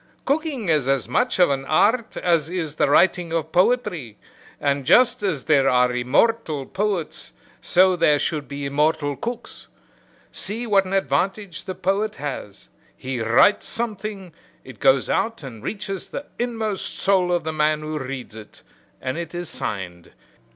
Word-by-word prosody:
Cooking 280 Hz, -, -1 dB
is 150 Hz, -5 st, +2 dB
as 135 Hz, -1 st, +1 dB
much 250 Hz, -, +1 dB
of 180 Hz, -5 st, +5 dB
an 135 Hz, -1 st, -1 dB
art 220 Hz, -, +2 dB
as 165 Hz, -3 st, +1 dB
is 170 Hz, -5 st, -3 dB
the -, -, +2 dB
writing 175 Hz, +2 st, +3 dB
of 160 Hz, -1 st, -2 dB
poetry, 180 Hz, -, +1 dB, 0.4 s
and 140 Hz, -1 st, 0 dB
just 240 Hz, -, +4 dB
as 175 Hz, -10 st, -1 dB
there 140 Hz, -4 st, +3 dB
are 125 Hz, 0 st, +3 dB
immortal 145 Hz, -, +1 dB
poets 195 Hz, -3 st, -3 dB, 0.3 s
so 185 Hz, +1 st, +4 dB
there 155 Hz, -4 st, +4 dB
should 150 Hz, 0 st, -2 dB
be 140 Hz, 0 st, -5 dB
immortal 145 Hz, +1 st, +1 dB
cooks. 240 Hz, -, -7 dB, 0.6 s
See 220 Hz, +5 st, -4 dB
what 200 Hz, -3 st, +3 dB
an 185 Hz, -, -5 dB
advantage 195 Hz, -1 st, -1 dB
the 185 Hz, -2 st, -5 dB
poet 195 Hz, +4 st, -1 dB
has 130 Hz, -9 st, -7 dB, 0.3 s
he 130 Hz, -2 st, -4 dB
writes 115 Hz, -, +4 dB
something, 210 Hz, -5 st, -5 dB, 0.3 s
it 130 Hz, -4 st, -12 dB
goes 135 Hz, -1 st, +4 dB
out 225 Hz, -7 st, -1 dB
and 120 Hz, -5 st, -9 dB
reaches 195 Hz, -2 st, -4 dB
the 285 Hz, -, -6 dB
inmost 225 Hz, -4 st, -3 dB
soul 190 Hz, -2 st, +2 dB
of 175 Hz, -1 st, +1 dB
the 160 Hz, 0 st, -3 dB
man 155 Hz, 0 st, +1 dB
who 155 Hz, 0 st, -4 dB
reads 130 Hz, -4 st, -6 dB
it, 110 Hz, -2 st, -13 dB, 0.4 s
and 130 Hz, +5 st, -2 dB
it 170 Hz, +1 st, -6 dB
is 175 Hz, 0 st, -5 dB
signed. 90 Hz, -4 st, -6 dB
165 Hz, 160 wpm, -22 LUFS, 140-200 Hz, 0.6 s, of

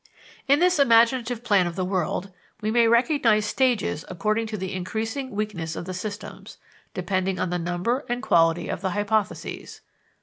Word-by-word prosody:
In 280 Hz, +1 st, +5 dB
this 355 Hz, 0 st, +3 dB
imaginative 235 Hz, -1 st, +3 dB
plan 200 Hz, -6 st, +3 dB
of 170 Hz, -, -5 dB
the 185 Hz, -1 st, -1 dB
world 185 Hz, +1 st, -2 dB, 0.3 s
we 215 Hz, 0 st, -2 dB
may 235 Hz, 0 st, +4 dB
recognize 235 Hz, -3 st, +3 dB
stages 235 Hz, -, 0 dB
according 215 Hz, +5 st, -1 dB
to 215 Hz, -1 st, -4 dB
the 190 Hz, 0 st, -4 dB
increasing 220 Hz, +8 st, -3 dB
weakness 205 Hz, -7 st, -4 dB
of -, -, -5 dB
the 185 Hz, -, -5 dB
systems, 205 Hz, +3 st, -7 dB, 0.4 s
depending 190 Hz, -1 st, -1 dB
on 180 Hz, -, -1 dB
the 180 Hz, -, -1 dB
number 180 Hz, -, -1 dB
and 245 Hz, +1 st, -2 dB
quality 165 Hz, 0 st, +3 dB
of -, -, -4 dB
the 190 Hz, 0 st, -2 dB
hypotheses. 205 Hz, 0 st, -2 dB
210 Hz, 165 wpm, -24 LUFS, 185-235 Hz, 0.4 s, In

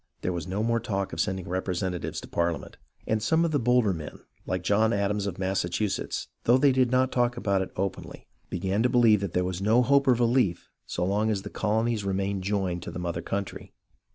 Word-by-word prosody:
There 90 Hz, -, -1 dB
was 85 Hz, 0 st, -4 dB
no 100 Hz, +4 st, -2 dB
more 115 Hz, 0 st, +1 dB
talk 100 Hz, -4 st, -3 dB
of 80 Hz, -, 0 dB
sending 95 Hz, -2 st, -2 dB
representatives 90 Hz, -1 st, -2 dB
to -, -, -10 dB
Parliament, 85 Hz, -3 st, -2 dB, 0.3 s
and 110 Hz, 0 st, 0 dB
some 160 Hz, +10 st, +2 dB
of 165 Hz, -, 0 dB
the 145 Hz, -, +2 dB
bolder 120 Hz, -4 st, +3 dB
men, 80 Hz, -3 st, -7 dB, 0.3 s
like 90 Hz, -1 st, -2 dB
John 110 Hz, +4 st, +3 dB
Adams 100 Hz, 0 st, 0 dB
of 90 Hz, -, -4 dB
Massachusetts, 95 Hz, +1 st, -1 dB, 0.2 s
though 120 Hz, +2 st, +6 dB
they 140 Hz, +1 st, +4 dB
did 130 Hz, -1 st, +3 dB
not 130 Hz, +1 st, +2 dB
talk 120 Hz, -1 st, +1 dB
it 95 Hz, -2 st, 0 dB
openly, 95 Hz, +1 st, -4 dB, 0.2 s
began 95 Hz, +4 st, -1 dB
to 125 Hz, -, +3 dB
believe 115 Hz, -5 st, +5 dB
that 100 Hz, -3 st, -3 dB
there 90 Hz, 0 st, +1 dB
was 90 Hz, 0 st, -3 dB
no 110 Hz, +5 st, +4 dB
hope 140 Hz, +2 st, +3 dB
of 125 Hz, -2 st, +4 dB
relief 120 Hz, -7 st, +1 dB, 0.2 s
so 90 Hz, -, -2 dB
long 105 Hz, +3 st, +1 dB
as 100 Hz, -3 st, -1 dB
the -, -, -7 dB
colonies 110 Hz, 0 st, 0 dB
remained 100 Hz, 0 st, -1 dB
joined 95 Hz, -3 st, -1 dB
to -, -, -6 dB
the -, -, -7 dB
mother 85 Hz, -1 st, -3 dB
country. 100 Hz, +3 st, -5 dB
100 Hz, 210 wpm, -27 LUFS, 90-115 Hz, 0.3 s, though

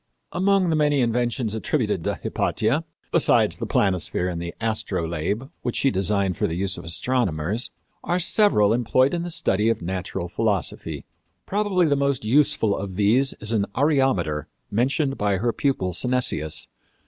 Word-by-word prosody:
Among 190 Hz, -1 st, +2 dB
the -, -, +2 dB
many 150 Hz, -2 st, +2 dB
inventions 120 Hz, -1 st, 0 dB
attributed 110 Hz, -3 st, -1 dB
to -, -, 0 dB
Hypatia, 130 Hz, +10 st, -1 dB, 0.3 s
besides -, -, +3 dB
the -, -, -4 dB
planisphere 90 Hz, -2 st, 0 dB
and 85 Hz, -1 st, -4 dB
astrolabe 105 Hz, -1 st, -2 dB
which 120 Hz, -, -3 dB
she 135 Hz, -, +2 dB
designed 95 Hz, -1 st, 0 dB
for -, -, +1 dB
the 80 Hz, -, -3 dB
use 95 Hz, +1 st, -1 dB
of 85 Hz, -, -8 dB
astronomers, 95 Hz, +1 st, -1 dB, 0.3 s
are 175 Hz, -, 0 dB
several 165 Hz, -, +3 dB
employed 130 Hz, +3 st, +2 dB
in 170 Hz, -, -1 dB
the 175 Hz, -, -4 dB
study 115 Hz, -, +1 dB
of 115 Hz, -, -1 dB
natural 90 Hz, 0 st, -3 dB
philosophy. 100 Hz, 0 st, -2 dB, 0.4 s
Probably 200 Hz, -3 st, +1 dB
the 145 Hz, -2 st, +2 dB
most 140 Hz, -4 st, 0 dB
useful 115 Hz, -4 st, +3 dB
of 95 Hz, -1 st, -5 dB
these 115 Hz, +7 st, +3 dB
is 105 Hz, +1 st, -5 dB
an 105 Hz, -3 st, +1 dB
areometer 130 Hz, -, +1 dB, 0.3 s
mentioned 135 Hz, +5 st, 0 dB
by 100 Hz, -2 st, +1 dB
her 115 Hz, +4 st, 0 dB
pupil 95 Hz, -10 st, 0 dB
Synesius. 125 Hz, -, 0 dB
110 Hz, 150 wpm, -24 LUFS, 95-135 Hz, 0.4 s, besides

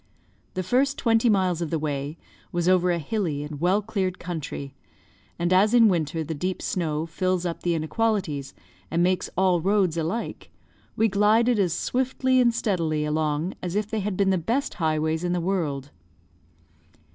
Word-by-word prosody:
The 185 Hz, -, -1 dB
first 270 Hz, +8 st, +1 dB
twenty 230 Hz, -1 st, +3 dB
miles 185 Hz, -4 st, +2 dB
of 165 Hz, -, -2 dB
the 165 Hz, -, 0 dB
way 145 Hz, 0 st, -3 dB, 0.3 s
was 175 Hz, 0 st, -1 dB
over 180 Hz, -1 st, +4 dB
a 175 Hz, -, +2 dB
hilly 160 Hz, -3 st, -2 dB
and 150 Hz, 0 st, -7 dB
well 190 Hz, +4 st, +2 dB
cleared 190 Hz, -4 st, -2 dB
country; 150 Hz, -5 st, -6 dB, 0.6 s
and 175 Hz, +1 st, +1 dB
as 205 Hz, +5 st, +4 dB
in 230 Hz, -2 st, +7 dB
winter 160 Hz, -3 st, -1 dB
the 160 Hz, +1 st, -4 dB
deep 180 Hz, +5 st, -3 dB
snow 160 Hz, -3 st, -2 dB
fills 180 Hz, +1 st, -1 dB
up 170 Hz, -1 st, -3 dB
the 175 Hz, -1 st, 0 dB
inequalities, 160 Hz, -5 st, -1 dB, 0.3 s
and 170 Hz, +2 st, +1 dB
makes 185 Hz, 0 st, +1 dB
all 185 Hz, -2 st, +3 dB
roads 190 Hz, -2 st, +2 dB
alike, 170 Hz, +8 st, -3 dB, 0.5 s
we 225 Hz, -, +3 dB
glided 215 Hz, +3 st, +3 dB
as 180 Hz, -4 st, +2 dB
swiftly 260 Hz, +3 st, +1 dB
and 240 Hz, -1 st, +4 dB
steadily 165 Hz, -9 st, 0 dB
along 155 Hz, +3 st, -1 dB
as 180 Hz, 0 st, -4 dB
if 210 Hz, 0 st, -1 dB
they 220 Hz, -, 0 dB
had 200 Hz, -2 st, -2 dB
been 195 Hz, -1 st, +3 dB
the 185 Hz, -, +2 dB
best 240 Hz, -, -1 dB
highways 160 Hz, -1 st, 0 dB
in 175 Hz, 0 st, 0 dB
the 180 Hz, -, 0 dB
world. 160 Hz, -7 st, -2 dB
180 Hz, 170 wpm, -25 LUFS, 160-205 Hz, 0.6 s, in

